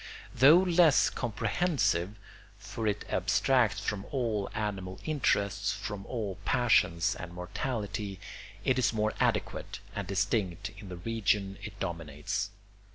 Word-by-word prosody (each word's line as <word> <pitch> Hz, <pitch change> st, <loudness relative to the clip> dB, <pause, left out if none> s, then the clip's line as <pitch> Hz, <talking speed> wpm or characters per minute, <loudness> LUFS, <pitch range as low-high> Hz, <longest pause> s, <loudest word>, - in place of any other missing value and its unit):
Though 140 Hz, +7 st, +8 dB
less 175 Hz, -4 st, +5 dB
comprehensive 110 Hz, -, 0 dB, 0.4 s
(for 110 Hz, -1 st, -4 dB
it 105 Hz, 0 st, -1 dB
abstracts 115 Hz, -6 st, +2 dB
from 100 Hz, 0 st, -2 dB
all 115 Hz, -7 st, -1 dB
animal 100 Hz, -3 st, -3 dB
interests, 100 Hz, -10 st, +1 dB
from 100 Hz, 0 st, -6 dB
all 105 Hz, -7 st, -4 dB
passion 115 Hz, -8 st, +3 dB, 0.2 s
and 90 Hz, -, -7 dB
mortality), 100 Hz, +1 st, -4 dB, 0.5 s
it 130 Hz, -1 st, +3 dB
is 115 Hz, -3 st, +2 dB
more 110 Hz, 0 st, 0 dB
adequate -, -, 0 dB, 0.2 s
and -, -, -3 dB
distinct 95 Hz, -2 st, 0 dB
in 100 Hz, -1 st, -10 dB
the 90 Hz, -, -6 dB
region 100 Hz, -1 st, 0 dB
it 100 Hz, -2 st, -8 dB
dominates. 85 Hz, +2 st, -3 dB
105 Hz, 120 wpm, -30 LUFS, 95-120 Hz, 0.5 s, Though